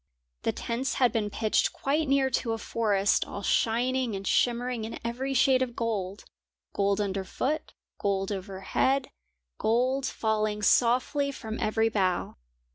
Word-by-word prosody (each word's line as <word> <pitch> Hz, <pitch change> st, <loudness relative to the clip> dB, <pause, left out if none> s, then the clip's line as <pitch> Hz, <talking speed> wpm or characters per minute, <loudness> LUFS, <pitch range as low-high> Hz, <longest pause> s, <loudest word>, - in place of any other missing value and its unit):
The -, -, 0 dB
tents 250 Hz, +3 st, -2 dB
had 250 Hz, -3 st, +3 dB
been 215 Hz, -2 st, -1 dB
pitched 215 Hz, +1 st, +1 dB
quite 300 Hz, +3 st, 0 dB
near 270 Hz, -1 st, +2 dB
to 230 Hz, -3 st, 0 dB
a -, -, -2 dB
forest 205 Hz, -3 st, +1 dB
all 200 Hz, -, -6 dB
shining 245 Hz, +2 st, +1 dB
and 195 Hz, 0 st, -6 dB
shimmering 245 Hz, +1 st, +1 dB
in 225 Hz, -, -5 dB
every 260 Hz, +4 st, -2 dB
shade 260 Hz, 0 st, +4 dB
of 245 Hz, -2 st, -2 dB
gold; 205 Hz, -4 st, -3 dB, 0.5 s
gold 200 Hz, 0 st, +1 dB
under 195 Hz, -1 st, -1 dB
foot, 280 Hz, +10 st, -3 dB, 0.2 s
gold 195 Hz, 0 st, 0 dB
overhead, 200 Hz, +7 st, -1 dB, 0.5 s
gold 255 Hz, +4 st, +1 dB
falling 215 Hz, -1 st, -1 dB
softly 255 Hz, +6 st, +3 dB
from 225 Hz, -4 st, -6 dB
every 220 Hz, +1 st, +2 dB
bough. 190 Hz, -5 st, 0 dB
230 Hz, 140 wpm, -28 LUFS, 205-255 Hz, 0.5 s, shade